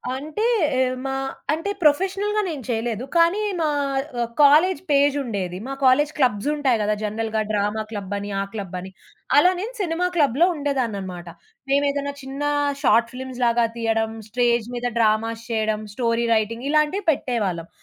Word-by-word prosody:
అంటే 305 +11 -3 0.3
ఎ - - +3 0.2
మా 270 0 -2 0.4
అంటే, 330 +6 -2
ప్రొఫెషనల్‌గా 385 +7 +2
నేను 295 -6 -5
చేయలేదు. 230 0 -2
కానీ, 340 +5 +4 0.2
మా 315 - +1 0.5
ఆహ్, 235 - -1
కాలేజ్ 310 +6 +5
పేజ్ 285 0 +4
ఉండేది. 190 -6 -3
మా 275 - -4
కాలేజ్ 290 +4 +4
క్లబ్స్ 250 -4 +1
ఉంటాయి 265 -6 +1
గదా! 210 0 +1
జనరల్‌గా 220 +1 -1
డ్రామా 210 +1 0
క్లబ్ 205 -2 -5
అని, 200 0 -5
ఆ - - 0
క్లబ్ 200 -5 -6
అని, 190 +1 -9 0.5
అలా 360 +5 +6
నేను 455 +6 -5
సినిమా 350 -1 0
క్లబ్‌లో 290 0 +3
ఉండేదాన్ననమాట. 215 - -3 0.4
మేమేదైనా 285 0 +1
చిన్న 270 +2 -7 0.4
షార్ట్ 235 -4 +3
ఫిలిమ్స్‌‌ 255 0 -7
లాగా 235 0 +3
తీయడం, 225 -1 0 0.2
స్టేజ్ 235 -1 +1
మీద 245 0 -1
డ్రామాస్ 225 +1 +1
చేయడం, 215 -1 0
స్టోరీ 235 -1 0
రైటింగ్, 230 +4 -1
ఇలాంటివి 305 +6 +1
పెట్టేవాళ్ళం. 200 - -2
245 Hz, 150 wpm, -23 LUFS, 220-290 Hz, 0.5 s, అలా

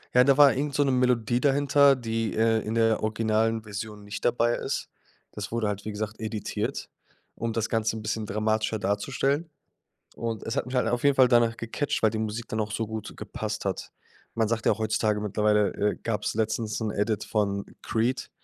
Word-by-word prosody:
Ja, 125 - +8
da 135 +1 +4
war 145 -2 +8
irgend 140 +1 -2
so 145 - +4
'ne 135 - +1
Melodie 125 -1 +2
dahinter, 140 0 +5
die, 115 -3 -2
äh, 115 0 +3
in 110 +2 -3
der 115 -1 +3
originalen 110 +1 +1
Version 105 0 -7
nicht 100 0 -7
dabei 120 0 +2
ist. - - -3 0.4
Das 105 - -6
wurde 115 -2 0
halt, 105 -1 -3
wie 110 - -3
gesagt, 105 +1 -5
editiert, 110 -1 -3 0.5
um 115 0 -3
das 115 0 -1
Ganze 110 -1 0
'n 110 - -7
bisschen 105 0 -2
dramatischer 110 +1 0
darzustellen. 135 - -1 0.7
Und 115 -2 -4
es 115 - -3
hat 140 - -1
mich 130 - -4
halt 125 - +2
auf 120 0 -1
jeden 140 -1 +4
Fall 130 -1 +6
danach 120 -2 +3
gecatcht, 115 +5 -2
weil 110 - +5
die 110 - -3
Musik 110 +1 -3
dann 110 - -2
auch 105 -1 -2
so 110 +2 -1
gut 110 0 -7
gepasst - - -5
hat. - - -3 0.4
Man 115 -1 +2
sagt 115 0 -1
ja, 110 - +3
heutzutage 110 -1 0
mittlerweile, 105 0 +2
äh, 105 0 0
gab's 110 -2 -2
letztens 110 0 -1
'nen 110 -2 -2
Edit 105 +1 -1
von 100 -2 -1 0.2
Creed, 120 +3 -1
110 Hz, 200 wpm, -27 LUFS, 105-120 Hz, 0.7 s, Ja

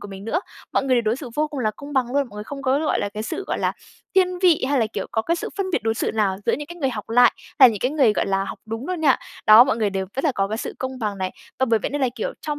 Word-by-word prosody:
của 205 - -9
mình 195 0 -9
nữa, 300 +11 0 0.3
mọi - - +1
người 265 -1 +2
đều 240 - +2
đối 220 +1 0
xử 270 -2 -7
vô 305 +1 +1
cùng 290 -3 -5
là 215 -3 +1
công 285 +1 -9
bằng 265 -3 +2
luôn. 280 -2 +1
Mọi 210 - -16
người 210 - -6
không 275 +3 -7
có, 265 +1 +2
gọi 310 0 0
là, 205 - -1
cái 215 - -3
sự, 310 - -4
gọi - - -2
là, - - 0 0.4
thiên 365 -1 +3
vị 355 -6 +4
hay 285 - +2
là, 225 - +2
kiểu, - - -3
có 225 - +1
cái 335 +8 0
sự - - -4
phân 395 - -1
biệt - - 0
đối 225 0 0
xử - - -1
nào 205 -4 +1
giữa - - +3
những 295 - -3
cái 345 - -10
người 275 -6 0
học 210 -4 -6
lại 245 +2 +6 0.3
hay 260 -3 +10
là - - 0
những 205 - -6
cái 250 - +1
người, 275 -8 +3
gọi - - -1
là, 195 0 0
học - - -7
đúng 225 +4 -5
luôn 365 -3 -2
nha. 285 -5 +4 0.3
Đó, 215 +2 +10
mọi 260 -4 0
người 215 -3 0
đều 190 -1 -2
rất 270 - -2
là 300 - +3
có 195 -4 -1
cái 220 +2 -3
sự - - -5
công 260 0 -4
bằng 210 -4 -3
này. 185 -1 -2 0.3
Và 260 - +2
bởi 230 -2 +3
vậy - - -3
nên 290 +1 -2
là, 260 - +2
kiểu, 230 - -3
trong 300 -1 -4
255 Hz, 350 wpm, -22 LUFS, 215-290 Hz, 0.4 s, hay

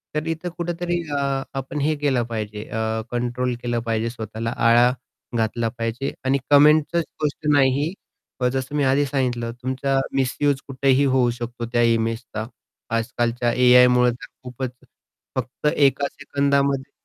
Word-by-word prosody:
तर 150 - -1
इथे 165 +2 -4
कुठेतरी 175 0 -2 0.2
आपण 135 +1 -3
हे 155 +2 +1
केलं 130 -5 +2
पाहिजे 105 -2 -4
अ, 110 0 -2
कंट्रोल 120 +1 -1
केलं 120 -1 0
पाहिजे 115 +1 0
स्वतःला 115 0 -5
आळा 120 +1 +6 0.5
घातला 115 +1 0
पाहिजे 115 +4 -3
आणि 135 +1 +3
कमेंटचीच 150 +3 +5 0.2
गोष्ट 150 +1 -2
नाही. 140 +4 +2 0.6
जसं 135 +2 -3
मी 145 - +2
आधी 145 +2 +2
सांगितलं 125 -4 -1
तुमचा 135 +1 0 0.2
मिस्यूज 135 +2 +1
कुठेही 135 +1 +2
होऊ 130 -2 +3
शकतो 120 0 -5
त्या 120 - +3
इमेजचा. 115 -1 -2 0.5
आजकालच्या 120 +1 0
एआयमुळे 125 0 +6
तर 120 - -9 0.2
खूपच 125 0 -5 0.6
फक्त 130 +4 -3
एका 140 0 +3
सेकंदामध्ये 140 -1 0
130 Hz, 130 wpm, -22 LUFS, 120-140 Hz, 0.6 s, आळा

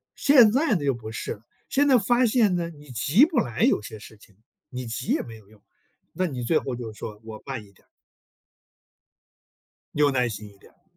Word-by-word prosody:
现 245 -7 +6
在 265 -2 +2
呢 155 - -2
又 135 -2 +2
不 110 -2 -8
是 - - -5
了， 105 - -15 0.3
现 285 +1 +2
在 265 - +6
发 240 +4 +2
现 215 -5 +3
呢， 170 -1 -2
你 150 -3 -15
急 145 - +4
不 330 0 0
来 120 -1 -3
有 - - +3
些 110 - -9
事 110 0 -14
情， 100 -2 -21 0.3
你 125 -3 -6
急 125 +3 -2
也 - - 0
没 115 -1 -10
有 105 - -20
用， 105 -1 -22 0.5
那 185 - -1
你 125 -5 -5
最 155 +6 +2
后 130 - -5
就 120 -2 -7
是 105 - -16
说： 105 -2 -7
“我 110 -1 -10
慢 130 -6 -5
一 100 - -20
点 - - -28
儿。” - - -41 2.1
有 145 -1 +3
耐 125 -2 +1
心 105 -1 -7
一 100 - -20
点 - - -20
儿。 - - -37
130 Hz, 240 characters per minute, -25 LUFS, -, 2.1 s, 现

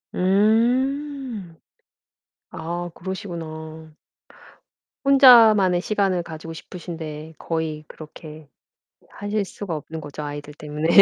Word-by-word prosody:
음. 235 - +1 0.9
아 175 +2 -4
그러시구나. 160 -4 -7 1.1
혼자만의 225 -9 +7
시간을 195 -3 0
가지고 165 0 -8
싶으신데 160 -2 -8
거의 160 -2 -3
그렇게 155 -1 -11 0.6
하실 205 0 -2
수가 190 -3 -5
없는 160 +2 -7
거죠. 150 0 -7
아이들 145 0 -6
때문에. 150 +1 -4
170 Hz, 220 characters per minute, -23 LUFS, 155-205 Hz, 1.1 s, 혼자만의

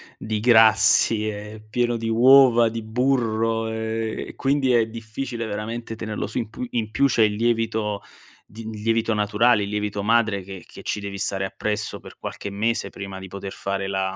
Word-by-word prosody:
di 110 -1 -3
grassi, 110 -1 +5
è 105 +1 -7
pieno 120 +1 0
di 115 0 -3
uova, 120 0 +6
di 115 0 -5
burro 115 -2 0
e 110 0 -3
quindi 135 -1 +1
è 115 -2 +4
difficile 115 +2 -6
veramente 115 +2 -5
tenerlo 110 -2 -4
su 105 - -6
in 115 -3 -2
pu 125 - -6
in 110 -3 -2
più 140 +6 +3
c'è 120 -4 +3
il 105 -1 +2
lievito 110 -2 0 0.4
di 110 +2 -9
lievito 115 +1 0
naturale, 105 +2 +3
il 100 - -4
lievito 105 -1 -2
madre 110 -3 +2
che 95 -2 -9
che - - -13
ci 105 - -2
devi 100 -1 -6
stare 95 -1 -1
appresso 105 +2 -3
per - - -14
qualche 100 - -6
mese 110 +3 -1
prima 100 -1 -7
di 95 0 -8
poter 100 +1 -7
fare 100 0 -3
la 95 -1 -2
110 Hz, 180 wpm, -23 LUFS, 105-115 Hz, 0.4 s, uova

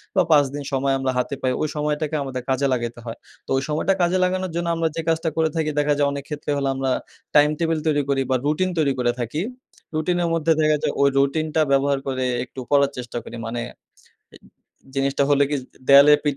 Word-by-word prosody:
বা 190 - +5
৫ 145 -2 +6
দিন 145 0 -5
সময় 135 0 +1
আমরা 135 0 0
হাতে 125 +3 -1
পাই। 130 - +1
ওই 155 - +1
সময়টাকে 150 +1 -1
আমাদের 130 -2 -5
কাজে 135 +1 +1
লাগাইতে 120 -1 -3
হয়। 115 -1 -6 0.3
তো - - -23
ওই 135 - -1
সময়টা 155 +6 +1
কাজে 175 +1 +2
লাগানোর 185 0 -1
জন্য 170 0 -1
আমরা 165 0 +1
যে 165 - -1
কাজটা 165 0 +1
করে 160 -1 +2
থাকি। 160 -2 0
দেখা 145 0 +2
যায় 145 -1 +3
অনেক 140 0 -5
ক্ষেত্রে 150 -1 -4
হলে, 140 -1 -1
আমরা 135 0 -1 0.4
টাইম 150 0 +6
টেবিল 165 -1 0
তৈরি 145 -2 +2
করি 135 -1 +2
বা - - +4
রুটিন 155 +5 +1
তৈরি 145 -4 +2
করে 120 -1 +2
থাকি। 120 +7 -3 0.5
রুটিনের 175 +2 0
মধ্যে 165 0 +1
দেখা 155 0 +3
যায় - - 0
ওই 140 - +5
রুটিনটা 155 +3 +1
ব্যবহার 140 0 +2
করে 130 -1 -1 0.2
একটু 130 +1 -10
পড়ার 140 -1 +3
চেষ্টা 120 -1 -6
করি - - -9
মানে 120 +1 -3 0.7
এ - - -13 0.6
জিনিসটা 140 0 +1
হলো 145 0 +4
কি? 145 - +1 0.3
দেয়ালের 140 +2 +8
পিঠ 145 -2 0
145 Hz, 215 wpm, -22 LUFS, 135-155 Hz, 0.7 s, দেয়ালের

